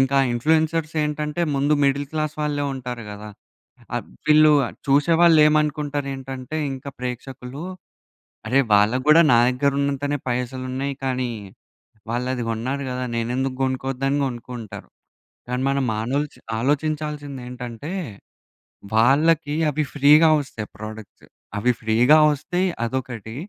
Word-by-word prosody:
ఇంక 135 0 +2
ఆ - - +3
ఇన్‌ఫ్లుయెన్సర్స్ 160 +4 +1
ఏంటంటే, 150 +2 -2
ముందు 145 +2 +2
మిడిల్ 140 +1 +1
క్లాస్ 155 -1 -2
వాళ్ళే 145 -1 -1
ఉంటారు 125 -2 -6
గదా! 105 +1 -8 0.7
అబ్ - - -5 0.2
వీళ్ళూ 155 0 +7
ఆహ్, - - -9
చూసేవాళ్ళు 165 +4 +5
ఏమనుకుంటారు 150 -2 0
ఏంటంటే, 135 +2 -6 0.2
ఇంకా 135 +1 -7
ప్రేక్షకులూ 125 +3 -6 0.8
అరే! 135 +3 +4
వాళ్ళకు 110 +6 +3
గూడా 165 +2 +8
నాదగ్గర 125 +4 +3
ఉన్నంతనే 140 +1 -1
పైసలు 125 +1 -3
ఉన్నయి. 140 +2 -2
కానీ, 130 -2 -1 0.8
వాళ్ళు 120 +2 -2
అది 120 - -3
గొన్నారు 130 +5 -3
గదా! 125 0 -3
నేనెందుకు 130 +3 -1
గొనుక్కోద్దని 135 +2 -1
గొనుక్కుంటరు. 120 -3 -7 0.6
కానీ, 125 +1 -2
మనం 140 -1 0
మానల్చ్ 135 +7 -2 0.2
ఆలోచించాల్సింది 145 0 -2
ఏంటంటే, 125 +5 -7 1.1
వాళ్ళకి 145 +5 +3 0.2
అవి 150 +1 -1
ఫ్రీగా 150 +3 +6
వస్తయి, 110 -6 -7
ప్రొడక్ట్స్. 110 -1 -10 0.3
అవి 125 +5 +2
ఫ్రీగా 115 +7 +4 0.2
వస్తయి 175 +6 -1 0.2
అదొకటీ, 120 -3 -5
135 Hz, 120 wpm, -22 LUFS, 125-150 Hz, 1.1 s, గూడా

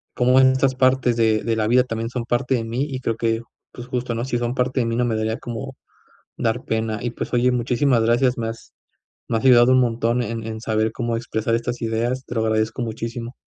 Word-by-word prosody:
cómo 125 +1 +4
en 130 0 +6
estas 130 0 +2
partes 130 -2 +2
de-de 110 0 +2
la 110 -1 0
vida 125 +2 +4
también 115 -2 -4
son 125 -1 -4
parte 125 +2 0
de 120 - -1
m,í 115 +3 -3
y 130 -2 -4
creo 115 -3 -2
que, 115 0 0 0.3
pues 120 - -9
justo, 125 -2 -3
¿no? 115 +2 -2
Si 120 -2 -1
son 120 +1 -2
parte 130 +1 0
de 120 - +1
mí 115 - -1
no 125 +1 +1
me 115 -2 0
daría 110 +1 -1
como 125 +3 -6 0.6
dar 115 +2 -1
pena. 110 -1 -1
Y 120 -1 -2
pues, - - -6
oye 125 +1 +3
muchísimas 125 0 +2
gracias 120 +2 +2
me 115 -1 -2
has 115 - -10 0.6
me 115 - +1
has 110 - -6
ayudado 125 -1 +6
un 130 - +5
montón 120 0 +1
en 115 -1 -4
en 110 0 -5
saber 110 0 0
cómo 120 -1 -2
expresar 115 -1 -1
estas 120 +1 -4
ideas 120 +3 -1
te - - -7
lo 110 - +1
agradezco 110 +2 0
muchísimo. 115 +1 -5
120 Hz, 230 wpm, -22 LUFS, 115-125 Hz, 0.6 s, en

